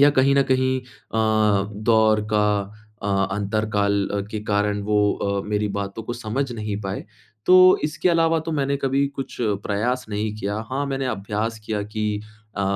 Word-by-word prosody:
या 145 +1 +7
कहीं 135 +1 +5
न 140 - +5
कहीं 130 0 +2
अ, 125 -2 -8 0.6
दौर 110 -1 +4
का 105 -1 +3 0.6
अ, 100 - -2 0.3
अंतर 105 +2 -1
काल 100 -1 +1 0.2
के 110 - -3
कारण 105 0 +1
वो 105 +1 +1 0.2
अ, 100 0 -1
मेरी 105 0 0
बातों 100 +2 -4
को 120 - -5
समझ 120 +3 -3
नहीं 105 -2 -4
पाए। 95 0 -4 0.4
तो 185 0 +8
इसके 155 +4 0
अलावा 165 -1 +3
तो 165 - -1
मैंने 140 -2 0
कभी 140 0 +1
कुछ 135 -1 -5 0.3
प्रयास 120 +5 -1
नहीं 105 0 -2
किया। 100 0 -3
हाँ, 135 +2 -1
मैंने 135 -1 -2
अभ्यास 110 0 -2
किया 105 -1 -2
कि 105 0 -2 0.4
अ, 100 - 0
110 Hz, 170 wpm, -23 LUFS, 105-135 Hz, 0.6 s, तो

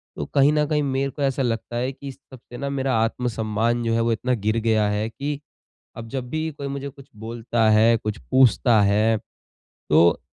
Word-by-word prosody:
तो - - -4
कहीं 140 +1 +5
न 150 -1 +2
कहीं 150 -1 0
मेरे 135 0 -1
को 145 - -8
ऐसा 135 0 0
लगता 120 -1 -2
है 130 +2 -1
कि 140 - -11
इस 135 - -7 0.2
सबसे 120 -1 -12
न 140 +1 -3
मेरा 135 -2 0
आत्मसम्मान 115 0 -1
जो 115 0 0
है 115 - +1
वो 115 - +1
इतना 125 +3 0
गिर 110 +1 +1
गया 110 -2 +3
है 105 +2 -1
कि 140 +4 -4 0.6
अब 115 0 -7
जब 125 -1 -5
भी 155 0 -2
कोई 140 -1 -7
मुझे 140 0 -5
कुछ 140 0 -16
बोलता 115 0 -1
है, 110 +2 +5
कुछ 110 -1 -4
पूछता 120 -3 +4
है, 105 +2 +3 0.7
तो 85 +3 +4
120 Hz, 205 wpm, -23 LUFS, 110-135 Hz, 0.7 s, कहीं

